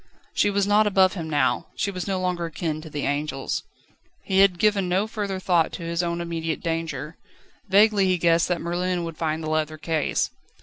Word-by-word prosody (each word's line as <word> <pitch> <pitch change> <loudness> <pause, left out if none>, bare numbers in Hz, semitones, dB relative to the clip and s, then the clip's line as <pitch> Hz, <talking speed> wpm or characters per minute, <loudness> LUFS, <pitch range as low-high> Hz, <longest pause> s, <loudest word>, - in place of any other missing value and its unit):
She 205 - +3
was 200 -1 +1
not 210 +1 +4
above 190 -2 +4
him 165 -4 -5
now, 130 -5 +1
she 200 0 -1
was 185 0 -5
no 190 -1 -1
longer 180 -2 -1
akin 155 -1 -3
to 160 - -10
the 145 -1 -4
angels. 145 -1 -2 0.6
He 190 0 +1
had 195 -2 +5
given 200 -1 +2
no 190 +3 +2
further 205 -3 -3
thought 175 -3 +2
to 175 - -6
his 170 +1 -1
own 170 0 -2
immediate 165 -2 -3
danger. 165 -2 -3 0.5
Vaguely 200 0 +5
he 185 -1 +2
guessed 170 0 +3
that 180 -2 -1
Merlin 175 +1 -1
would 165 -2 -6
find 160 0 -2
the 155 - -3
leather 155 0 -1
case. 160 -1 -1
170 Hz, 200 wpm, -24 LUFS, 160-190 Hz, 0.6 s, had